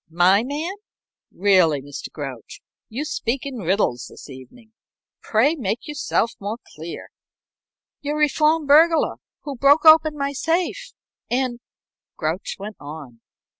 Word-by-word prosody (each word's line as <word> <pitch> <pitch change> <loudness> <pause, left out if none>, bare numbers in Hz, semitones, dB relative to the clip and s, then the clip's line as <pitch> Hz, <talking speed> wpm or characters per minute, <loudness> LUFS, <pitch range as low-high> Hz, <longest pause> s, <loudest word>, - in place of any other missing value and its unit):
"My 180 +5 +4
man? 295 +8 -3 0.6
Really, 185 -6 +3
Mr. 140 +1 -8
Grouch, 135 -6 -8 0.3
you 260 +7 -4
speak 265 -3 -2
in 265 -4 -5
riddles 180 - 0
this - - -12
evening. 220 - -14 0.5
Pray 235 +8 +2
make 235 - -3
yourself 280 -5 0
more 205 +3 -4 0.2
clear." 160 +2 -8 0.9
"Your 295 +1 -2
reformed 305 +1 +2
burglar, 320 +3 +5 0.3
who 285 -2 -5
broke 280 +5 +4
open 315 -1 +7
my 280 0 -2
safe, 345 - -1 0.4
and 250 -1 -1 0.3
" - - -72
Grouch 160 +4 -3
went 205 +2 -8
on. 145 -6 -10
235 Hz, 130 wpm, -22 LUFS, -, 0.9 s, open